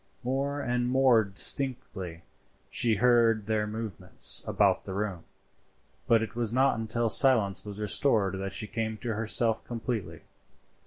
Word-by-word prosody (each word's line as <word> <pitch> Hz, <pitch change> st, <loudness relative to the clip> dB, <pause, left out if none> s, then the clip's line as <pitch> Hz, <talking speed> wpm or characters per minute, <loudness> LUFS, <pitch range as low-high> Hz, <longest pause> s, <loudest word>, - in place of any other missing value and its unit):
More 135 Hz, +3 st, -2 dB
and 120 Hz, -1 st, -1 dB
more 130 Hz, -3 st, +4 dB
distinctly 95 Hz, -5 st, -1 dB, 0.5 s
she 115 Hz, -2 st, +1 dB
heard 115 Hz, -2 st, +2 dB
their 105 Hz, 0 st, -1 dB
movements 110 Hz, -4 st, +1 dB
about -, -, +1 dB
the 95 Hz, -, -6 dB
room, 100 Hz, -5 st, -4 dB, 0.8 s
but 115 Hz, -1 st, +3 dB
it 115 Hz, -, -8 dB
was 115 Hz, -2 st, -1 dB
not 130 Hz, -1 st, +1 dB
until 115 Hz, +1 st, -1 dB
silence 110 Hz, -5 st, +4 dB
was 105 Hz, -1 st, -9 dB
restored 105 Hz, -3 st, 0 dB
that 95 Hz, 0 st, -4 dB
she 105 Hz, -, -5 dB
came 110 Hz, 0 st, -4 dB
to 115 Hz, +1 st, -4 dB
herself 110 Hz, +1 st, 0 dB
completely. 120 Hz, -2 st, -5 dB
115 Hz, 140 wpm, -28 LUFS, 105-120 Hz, 0.8 s, more